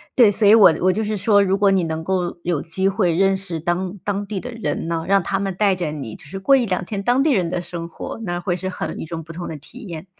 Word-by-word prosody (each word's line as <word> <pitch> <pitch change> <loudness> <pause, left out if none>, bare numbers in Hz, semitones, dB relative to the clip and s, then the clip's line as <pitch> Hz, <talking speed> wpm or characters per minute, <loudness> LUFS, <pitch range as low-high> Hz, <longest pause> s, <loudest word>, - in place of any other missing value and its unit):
对， 235 -6 +6
所 205 +1 +2
以 210 - +8
我 190 -7 +7
我 185 +1 +4
就 220 +3 -1
是 215 +1 -2
说， 205 0 +4
如 195 0 +1
果 200 -1 +4
你 190 -2 +2
能 160 0 -3
够 180 -1 -1
有 170 -4 -1
机 190 +4 -1
会 190 -4 +1
认 195 +2 +3
识 180 -4 -4
当 180 +4 -2
当 205 0 -2
地 205 -2 -3
的 245 +5 -7
人 230 -7 -3
呢， 165 -1 -2
让 195 0 +4
他 195 - -1
们 195 -2 -2
带 200 -2 +3
着 175 -4 -3
你 135 -8 -6
就 - - -14
是 190 +7 -7
过 270 +8 +4
1-2 205 -8 0
天 200 +2 -4
当 250 +4 +3
地 305 - +3
人 185 -8 +2
的 175 - -2
生 170 -1 -6
活， 170 - -7
那 175 -3 -2
会 175 0 -1
是 185 +1 -4
很 - - -5
与 - - -5
众 165 0 -6
不 165 - -10
同 175 +1 -6
的 160 - -5
体 145 - -11
验。 170 -4 -8
190 Hz, 300 characters per minute, -21 LUFS, 170-200 Hz, -, 以